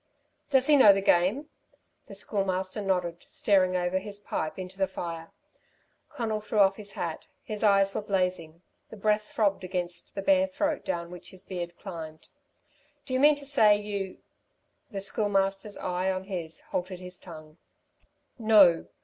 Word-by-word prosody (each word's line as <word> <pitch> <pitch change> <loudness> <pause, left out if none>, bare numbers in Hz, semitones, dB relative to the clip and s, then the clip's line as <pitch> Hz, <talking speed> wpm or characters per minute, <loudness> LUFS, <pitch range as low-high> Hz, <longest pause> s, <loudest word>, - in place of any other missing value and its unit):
"Does 265 -2 +4
he 300 0 +6
know 210 -7 +8
the 195 - 0
game?" 195 - +2 0.6
The - - -9
Schoolmaster 190 0 -2
nodded, 180 -3 -1
staring 185 -3 +2
over 180 +1 0
his 200 +1 -7
pipe 160 -6 -4
into 185 0 -7
the 190 - +2
fire. 165 -2 -6 0.8
Conal 225 -7 -3
threw 215 +1 -4
off 195 -1 +5
his 205 -2 -8
hat. 165 -2 -5 0.2
His 215 0 -5
eyes 195 -1 +4
were - - -2
blazing. 180 -4 -2 0.3
The 220 - -10
breath 210 +1 0
throbbed 200 -3 +1
against 175 -1 -4
the 195 - -3
bare 285 +4 +4
throat 295 +1 -2
down 170 0 -3
which 180 - -10
his 185 0 -13
beard 175 -3 -6
climbed. 160 -5 -9 0.8
"Do 255 - -5
you 255 - +2
mean 295 +2 +6
to 285 -1 -6
say, 220 -7 +5
you 200 -2 -4 0.4
" - - -46
The 195 -2 -4
Schoolmaster's 195 0 0
eye 185 0 -1
on 185 0 -3
his, 175 -4 -5
halted 185 +1 -3
his 180 0 -9
tongue. 155 -2 -12 0.8
"No. 205 -7 +5
195 Hz, 165 wpm, -28 LUFS, 180-210 Hz, 0.8 s, know